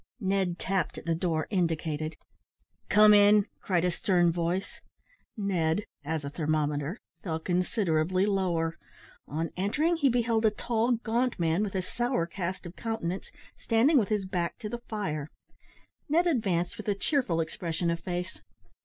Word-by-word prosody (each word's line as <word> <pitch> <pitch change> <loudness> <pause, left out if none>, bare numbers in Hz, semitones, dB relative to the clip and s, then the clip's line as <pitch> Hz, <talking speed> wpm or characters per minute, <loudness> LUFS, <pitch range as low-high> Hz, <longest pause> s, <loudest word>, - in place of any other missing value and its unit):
Ned 190 -4 0
tapped 190 -1 -1
at - - -8
the 165 - +1
door 165 -2 0
indicated. 160 -4 -1 0.7
"Come 210 0 +7
in," 205 0 +6 0.2
cried 180 -3 +1
a 180 - +2
stern 175 -1 +2
voice. 175 +3 -2 0.6
Ned, 190 -2 0 0.2
(as 155 0 -3
a - - -3
thermometer), 150 +2 -1 0.2
fell 160 -4 -2
considerably 180 0 +1
lower. 175 -5 0 0.5
On 160 +3 -3
entering, 300 - +1
he 285 -4 +3
beheld 230 -2 +1
a 220 - +6
tall, 230 +2 0
gaunt 240 +2 0
man, 165 +2 +1
with 200 -2 -4
a 185 - 0
sour 240 -2 -1
cast 180 +2 -4
of 175 +1 -8
countenance, 195 -5 -3 0.3
standing 255 +6 +4
with 210 - 0
his 210 -3 0
back 175 -2 -2
to 215 -3 -6
the 240 - -4
fire. 155 -9 -3 0.8
Ned 335 +4 +3
advanced 195 - 0
with 215 - -8
a 205 - +2
cheerful 200 - +1
expression 165 +1 -1
of 170 - -2
face. 180 +1 -5
185 Hz, 155 wpm, -29 LUFS, 165-215 Hz, 0.8 s, Come